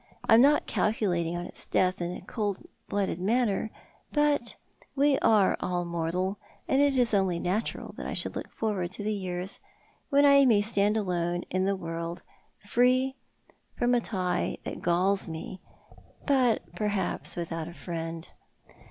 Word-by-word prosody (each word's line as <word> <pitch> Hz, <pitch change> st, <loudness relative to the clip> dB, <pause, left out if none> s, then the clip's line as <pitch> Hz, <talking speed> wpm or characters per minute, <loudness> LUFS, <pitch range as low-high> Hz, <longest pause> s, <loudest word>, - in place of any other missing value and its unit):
I -, -, +6 dB
am 225 Hz, -, +8 dB
not 290 Hz, +3 st, +5 dB
calculating 175 Hz, -6 st, 0 dB
on 175 Hz, -, -4 dB
his -, -, -10 dB
death 185 Hz, 0 st, +1 dB
in 175 Hz, 0 st, -2 dB
a -, -, -7 dB
cold 205 Hz, 0 st, -3 dB, 0.2 s
blooded 195 Hz, -4 st, -1 dB
manner; 220 Hz, +1 st, +1 dB, 0.4 s
but 295 Hz, -5 st, +1 dB, 0.4 s
we 280 Hz, 0 st, +3 dB
are 210 Hz, -3 st, +4 dB
all 175 Hz, -1 st, -1 dB
mortal, 170 Hz, +3 st, -2 dB, 0.3 s
and 270 Hz, -, +3 dB
it 285 Hz, -2 st, +3 dB
is 245 Hz, -3 st, +3 dB
only 190 Hz, -4 st, +2 dB
natural 190 Hz, +6 st, -2 dB
that -, -, -5 dB
I -, -, -3 dB
should -, -, -3 dB
look -, -, -5 dB
forward 200 Hz, -6 st, -2 dB
to 205 Hz, -, -5 dB
the 215 Hz, +1 st, 0 dB
years 185 Hz, -1 st, -4 dB, 0.5 s
when 285 Hz, +1 st, +5 dB
I 280 Hz, -1 st, +7 dB
may 215 Hz, -4 st, +5 dB
stand 205 Hz, 0 st, +2 dB
alone 175 Hz, -3 st, -1 dB
in 185 Hz, +1 st, +1 dB
the 195 Hz, 0 st, +1 dB
world, 165 Hz, -1 st, -5 dB, 0.4 s
free 255 Hz, +4 st, +2 dB, 0.6 s
from 245 Hz, 0 st, +2 dB
a 240 Hz, -, +3 dB
tie 185 Hz, -5 st, -1 dB
that' -, -, -6 dB
galls 185 Hz, +3 st, +1 dB
me, 165 Hz, +3 st, -7 dB, 0.6 s
but 255 Hz, -5 st, +3 dB
perhaps 210 Hz, -2 st, -1 dB
without 165 Hz, -2 st, -4 dB
a 170 Hz, -, -8 dB
friend. 165 Hz, -2 st, -5 dB
195 Hz, 160 wpm, -28 LUFS, 175-235 Hz, 0.6 s, am